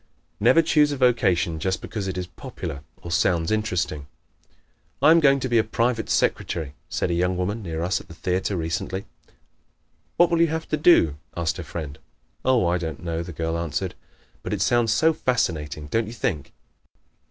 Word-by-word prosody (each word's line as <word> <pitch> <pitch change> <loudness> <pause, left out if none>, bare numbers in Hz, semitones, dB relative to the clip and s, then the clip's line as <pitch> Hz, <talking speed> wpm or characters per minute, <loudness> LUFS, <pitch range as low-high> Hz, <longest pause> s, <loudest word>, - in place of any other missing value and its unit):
Never 125 +10 +5
choose 150 -2 +3
a 145 - -2
vocation 95 -11 +2
just 95 +3 -1
because 105 -3 -5
it 95 -1 -3
is 90 - -2
popular 70 -5 -7 0.2
or 85 - -6
sounds 85 0 +1
interesting. 90 -9 -1 0.9
"I 150 +4 +6
am 165 - +7
going 140 -3 +4
to 130 - -1
be 120 -2 +3
a - - +3
private 115 +1 -1
secretary," 80 -5 0 0.2
said - - -1
a - - +1
young 90 +1 +1
woman 100 +5 -2
near 85 -4 -4
us 90 +2 0
at - - -18
the 85 - -12
theater 95 +3 -1
recently. 85 +4 -3 1.1
"What 175 0 +5
will 170 -1 +3
you 170 - +5
have 160 +1 -3
to - - +1
do?" 115 - +5 0.2
asked 85 -2 -1
her - - -5
friend. 75 -3 -7 0.4
"Oh, 125 -6 +3
I 85 +1 +1
don't 80 -3 -5
know," 85 -1 -2
the 85 +1 -6
girl 80 0 -2
answered, 85 -3 -2 0.5
"but - - -4
it 100 - -2
sounds 120 0 +2
so 160 +9 +4
fascinating, 80 - -1
don't 110 +8 -1
you 110 - -7
think?" 75 - -2
95 Hz, 185 wpm, -24 LUFS, 85-120 Hz, 1.1 s, am